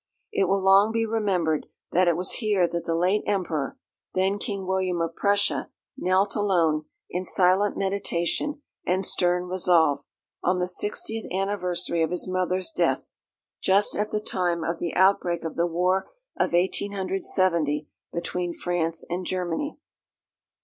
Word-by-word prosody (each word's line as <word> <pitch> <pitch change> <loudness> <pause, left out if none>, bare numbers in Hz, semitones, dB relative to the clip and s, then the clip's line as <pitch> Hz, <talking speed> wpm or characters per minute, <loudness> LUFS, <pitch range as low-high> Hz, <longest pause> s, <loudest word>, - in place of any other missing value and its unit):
It 410 -2 +2
will 195 - +3
long 195 +3 +5
be 225 0 +1
remembered 190 -8 0 0.2
that 180 +1 +3
it 170 -1 +3
was 180 +1 0
here 205 -5 +3
that 170 0 -4
the 165 - 0
late 185 +5 +2
Emperor, 170 -8 -1 0.4
then 190 +2 +1
King 200 -4 -4
William 185 -2 0
of 165 0 -2
Prussia, 200 0 +1 0.3
knelt 190 +2 +1
alone, 170 -7 +2 0.3
in 180 +1 -2
silent 185 +2 +3
meditation 200 - -1 0.2
and 185 +1 0
stern 180 0 +1
resolve, 170 -6 +3 0.4
on 180 +1 +2
the 180 0 0
sixtieth 210 +4 -2
anniversary 180 -3 -1
of 160 - +2
his 180 +1 -1
mother's 185 - -1
death, - - 0 0.5
just 195 +2 +3
at 210 +1 -1
the 210 - -1
time 175 -5 -1
of 165 +1 -2
the 170 - -3
outbreak 185 -3 +3
of 165 - -4
the 170 +1 +1
war 180 +3 +1 0.3
of - - 0
1870 185 -4 +1 0.2
between 175 0 -3
France 165 -2 -1
and 175 +2 -3
Germany. 185 - -2
185 Hz, 145 wpm, -25 LUFS, 170-195 Hz, 0.5 s, long